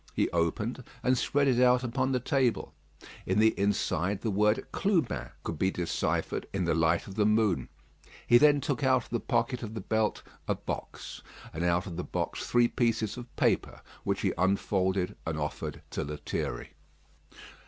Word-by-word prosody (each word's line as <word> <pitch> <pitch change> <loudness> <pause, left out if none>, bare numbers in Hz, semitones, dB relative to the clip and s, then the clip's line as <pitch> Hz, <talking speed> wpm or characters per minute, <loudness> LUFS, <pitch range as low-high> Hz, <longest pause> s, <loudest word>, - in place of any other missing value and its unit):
He - - +1
opened, 105 +9 -1 0.2
and 130 +1 +3
spread 140 +3 +1
it 125 -2 +3
out 125 0 +5
upon 130 +2 0
the 130 - +1
table; 125 -1 0 0.5
in 95 - +1
the 110 +1 +6
inside 100 -2 0
the 110 - -1
word 105 +2 +2
"Clubin" 160 - 0
could 80 - -4
be 95 - +3
deciphered 90 -3 -2
in 95 -2 -1
the 85 - +2
light 80 +1 +2
of 95 - -9
the 105 +1 +2
moon. 105 -3 +2 0.6
He 120 - +6
then 145 0 +5
took 140 0 -2
out 130 -2 +3
of - - -17
the 120 - 0
pocket 120 +2 0
of 110 -1 -6
the - - -3
belt 110 +2 0 0.2
a - - +1
box, - - -6 0.3
and 85 - -3
out 90 +1 +2
of 85 -4 -7
the 90 - -2
box - - -3
three 120 -1 +4
pieces 115 -4 0
of 120 -1 -10
paper, - - 0 0.2
which - - -1
he - - +1
unfolded 95 -1 +1
and 80 -1 -1
offered 75 -1 -4
to - - -2
Lethierry. 70 -4 -4
110 Hz, 175 wpm, -29 LUFS, 90-125 Hz, 0.6 s, the